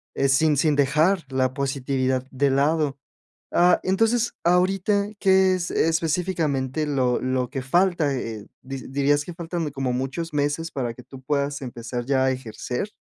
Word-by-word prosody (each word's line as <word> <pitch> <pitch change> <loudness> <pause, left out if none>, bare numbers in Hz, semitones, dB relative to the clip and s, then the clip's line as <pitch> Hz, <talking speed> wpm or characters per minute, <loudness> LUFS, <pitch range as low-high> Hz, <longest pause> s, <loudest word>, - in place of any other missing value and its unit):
eh, 140 - +2
sin 150 +2 +3
sin 150 +1 +2
dejar 155 +6 +2
la 130 -1 +1
positividad 130 -1 -1
de 140 +1 +1
lado. 145 +1 +1 0.6
Ah, 175 +1 +4
entonces, 225 +5 +1
ahorita, 190 +3 +2
¿qué 190 -1 +4
es 180 -1 -3
específicamente 160 -4 0
lo 130 -4 +1
lo 130 -1 -1
que 135 -1 -4
falta? 170 0 +2
Eh, 110 -5 -5 0.2
¿di 135 0 -7
dirías 140 +2 +1
que 175 - -8
faltan 170 0 -4
de 145 - -5
como 135 -2 -2
muchos 135 +6 -3
meses, 145 +3 -1
para 120 -4 -3
que 125 - -12
tú 135 +1 -12
puedas 140 +1 -1
empezar 120 -1 -5
ya 135 -1 +2
a 130 - +3
ejercer? 125 - -4
140 Hz, 160 wpm, -24 LUFS, 130-170 Hz, 0.6 s, Ah